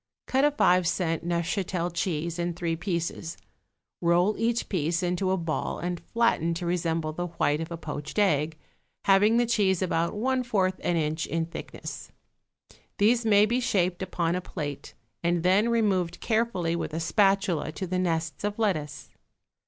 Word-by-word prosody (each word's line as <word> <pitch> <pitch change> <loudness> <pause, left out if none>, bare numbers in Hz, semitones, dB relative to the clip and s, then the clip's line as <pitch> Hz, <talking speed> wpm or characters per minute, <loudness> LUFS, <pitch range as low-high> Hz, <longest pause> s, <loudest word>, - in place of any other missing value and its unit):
Cut 265 +1 +1
a 295 - +6
five 180 - +3
cent 165 -2 0
Neufchatel 175 +1 -1
cheese 170 -1 -2
in 175 0 -1
three 170 -1 -1
pieces; 170 -1 -3 0.6
roll 175 +4 +3
each 235 +1 0
piece 170 -1 0
into 180 +2 0
a 190 - +2
ball 165 -3 -2
and 175 0 -3
flatten 170 -8 +1
to 175 +1 -4
resemble 165 -2 -1
the 175 +2 -3
white 160 -2 0
of 165 - -5
a 170 - -5
poached 150 0 -6
egg, 155 -6 +2 0.5
having 205 +4 +5
the 240 - +3
cheese 200 -6 +2
about 170 -2 0
one 260 +4 +1
fourth 195 -6 0
an 175 - +1
inch 155 0 -1
in 165 +2 -1
thickness. 165 - -8 0.9
These 225 +3 +3
may 205 -1 +6
be 240 +4 +1
shaped 185 -7 0
upon 175 -3 -1
a 180 - -1
plate 145 -5 -6 0.3
and 170 -1 +1
then 195 +5 +4
removed 190 -7 +1
carefully 220 -7 0
with 165 -2 -3
a - - -1
spatula 195 -2 +2
to 190 - -4
the 180 0 -1
nests 165 -3 -1
of 205 0 -2
lettuce. 155 -10 -2
175 Hz, 165 wpm, -27 LUFS, 165-200 Hz, 0.9 s, a